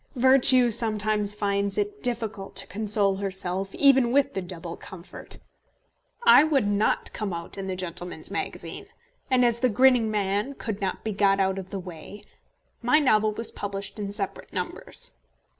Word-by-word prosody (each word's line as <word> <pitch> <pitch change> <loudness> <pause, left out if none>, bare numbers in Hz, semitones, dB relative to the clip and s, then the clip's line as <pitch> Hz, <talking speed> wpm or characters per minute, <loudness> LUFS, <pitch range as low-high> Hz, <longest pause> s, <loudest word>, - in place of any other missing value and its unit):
Virtue 255 -1 +6
sometimes 215 -2 +1
finds 200 -1 -1
it 415 0 -3
difficult 225 -5 -2
to - - 0
console 200 -1 +1
herself 195 -1 -3
even 265 -4 +4
with 280 +1 +2
the 190 - -3
double 175 -2 -7
comfort. 180 -1 -11 0.9
I 470 -10 +8
would 290 -7 +1
not 205 +1 0
come 210 -3 -3
out 170 0 -7
in 195 -1 -6
the 190 - -3
Gentleman's 175 -2 -6
Magazine, 200 - -5 0.4
and 255 -2 +3
as 235 -1 +1
the 255 +1 +2
Grinning 245 0 +3
Man 210 +5 -1
could 220 -5 -5
not 190 -2 -3
be 220 - -3
got 195 0 +2
out 190 0 0
of 185 -1 -9
the 195 - -5
way, 180 +2 -10 0.6
my 250 +5 +3
novel 215 -7 +3
was 230 - -3
published 200 +1 -6
in 200 -1 -4
separate 200 -2 -4
numbers. - - -5
205 Hz, 160 wpm, -25 LUFS, 195-240 Hz, 0.9 s, I